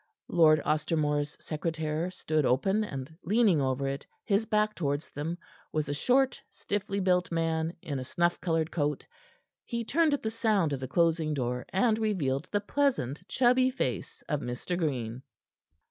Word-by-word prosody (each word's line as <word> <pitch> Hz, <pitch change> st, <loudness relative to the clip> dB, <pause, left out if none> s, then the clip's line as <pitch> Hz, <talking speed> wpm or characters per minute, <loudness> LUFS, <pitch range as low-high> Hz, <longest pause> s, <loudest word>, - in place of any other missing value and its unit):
Lord 155 Hz, -3 st, +5 dB
Ostermore's 150 Hz, -1 st, 0 dB
secretaire 160 Hz, +1 st, -2 dB
stood 155 Hz, -4 st, -1 dB
open, 190 Hz, -, +2 dB
and 140 Hz, -5 st, -6 dB
leaning 200 Hz, -4 st, +3 dB
over 135 Hz, +1 st, 0 dB
it, 140 Hz, +1 st, -4 dB, 0.2 s
his 215 Hz, +1 st, +1 dB
back 215 Hz, 0 st, +2 dB
towards 145 Hz, -4 st, -2 dB
them 160 Hz, +4 st, -3 dB, 0.3 s
was 155 Hz, -1 st, -1 dB
a 145 Hz, -, -1 dB
short, 255 Hz, -, +2 dB
stiffly 200 Hz, 0 st, -3 dB
built 180 Hz, -2 st, +2 dB
man 165 Hz, 0 st, 0 dB
in 140 Hz, -3 st, -3 dB
a -, -, -4 dB
snuff 175 Hz, +6 st, 0 dB
colored 165 Hz, -2 st, 0 dB
coat. 145 Hz, -3 st, -1 dB, 0.6 s
He 235 Hz, -1 st, -3 dB
turned 310 Hz, +3 st, +3 dB
at -, -, -8 dB
the 220 Hz, -, -1 dB
sound 215 Hz, -9 st, +1 dB
of 135 Hz, -, -2 dB
the 130 Hz, -, -4 dB
closing 160 Hz, +1 st, +2 dB
door, 125 Hz, -2 st, -2 dB
and 220 Hz, +3 st, +2 dB
revealed 165 Hz, -9 st, 0 dB
the 205 Hz, -, +1 dB
pleasant, 210 Hz, -, 0 dB
chubby 255 Hz, 0 st, +4 dB
face 260 Hz, -, -3 dB
of 150 Hz, -, 0 dB
Mr. 125 Hz, +7 st, -3 dB
Green. 130 Hz, -8 st, -2 dB
165 Hz, 160 wpm, -29 LUFS, 145-205 Hz, 0.6 s, Lord